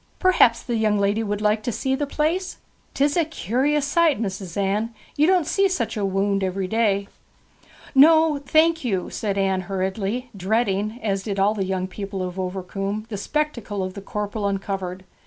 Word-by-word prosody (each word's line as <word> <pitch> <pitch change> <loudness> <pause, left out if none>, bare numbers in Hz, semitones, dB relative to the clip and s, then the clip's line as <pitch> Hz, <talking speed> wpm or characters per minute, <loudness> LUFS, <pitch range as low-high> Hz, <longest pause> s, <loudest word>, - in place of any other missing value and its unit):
Perhaps 360 -11 +4
the 240 -3 -2
young 215 -1 +2
woman 205 +2 +1
would 205 0 -2
like 210 0 +2
to 240 - -2
see 265 +4 -1
the 285 +2 -1
place? 325 +6 -1 0.4
'Tis 285 +1 +2
a 340 - +3
curious 290 - 0
sight, 315 -2 +3
Mis'ess 190 -4 -4
Anne; 210 +4 0 0.2
you 300 +2 +3
don't 365 -3 +3
see 390 +5 +2
such 260 -12 -2
a - - -3
wownd 195 +1 +1
every 190 0 -1
day.' 200 -2 +1 0.9
'No, 315 +1 +6
thank 320 +3 +3
you,' 195 -7 -1
said 200 -2 -2
Anne 190 -1 +1
hurriedly, 195 +6 -2
dreading, 210 +2 0
as 195 -3 0
did 200 -1 -3
all 200 +2 +3
the 200 -3 -2
young 185 -1 -1
people 195 0 -5
of 180 +1 -5
Overcombe, 195 +3 -3
the 215 - -4
spectacle 235 -6 -2
of 185 0 -4
the 200 - -8
corporal 205 +1 -3
uncovered. 195 -2 -3
210 Hz, 175 wpm, -23 LUFS, 195-270 Hz, 0.9 s, No